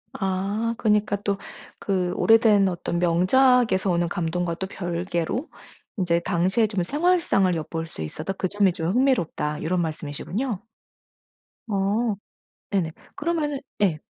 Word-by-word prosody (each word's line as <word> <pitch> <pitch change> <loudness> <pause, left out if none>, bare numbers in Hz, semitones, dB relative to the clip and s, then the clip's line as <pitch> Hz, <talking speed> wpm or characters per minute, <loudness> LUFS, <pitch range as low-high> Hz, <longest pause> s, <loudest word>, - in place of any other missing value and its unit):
아 200 +4 -1
그니까 210 -1 +2
또 200 -1 -1 0.4
그 185 -3 0
오래된 220 -3 +5
어떤 175 -1 -2
명작에서 190 +4 +3
오는 175 -1 +1
감동과 175 -1 -1
또 190 - -4
별개로 175 - -3 0.5
인제 170 -3 +2
당시에 190 +5 +2
좀 200 -4 -1
생활상을 295 - +2
엿볼 165 0 -4
수 160 - -9
있어서 80 - -4
그 190 - -2
점이 200 -1 +3
좀 165 -1 -2
흥미롭다 185 - +1
요런 175 +2 +1
말씀이시군요? 175 - -3 1.1
아. 205 +2 0 0.5
네네. 185 -5 0 0.2
그러면은 295 -3 -1 0.2
예. 175 -7 +2
190 Hz, 270 characters per minute, -24 LUFS, 175-220 Hz, 1.1 s, 오래된